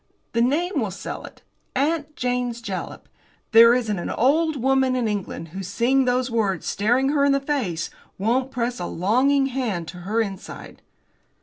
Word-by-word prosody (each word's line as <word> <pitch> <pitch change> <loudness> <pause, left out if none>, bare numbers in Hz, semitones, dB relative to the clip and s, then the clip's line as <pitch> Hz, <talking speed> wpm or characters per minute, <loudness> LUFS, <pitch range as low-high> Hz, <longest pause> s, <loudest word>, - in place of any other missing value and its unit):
The 230 - +1
name 315 +10 +1
will - - -1
sell - - -6
it! - - -14 0.3
'Aunt 300 +2 0
Jane's 245 -1 -1
Jalap!' 195 -5 -6 0.4
There 230 +1 +8
isn't 220 -6 -1
an - - -4
old 310 +5 +2
woman 265 0 +2
in 245 -3 0
England 195 -5 -4
who, 190 +5 -6
seeing 235 +8 +1
those 250 0 +1
words 200 -7 0
staring 245 +6 +1
her 285 -1 +2
in 280 0 +4
the 275 - +2
face, 255 - -2 0.3
won't 245 +6 +1
press 245 -2 -2
a 175 - -3
longing 260 +10 +2
hand 240 -11 -2
to 180 - -9
her 200 +6 -2
inside." 200 -4 -5
245 Hz, 170 wpm, -23 LUFS, 210-270 Hz, 0.4 s, There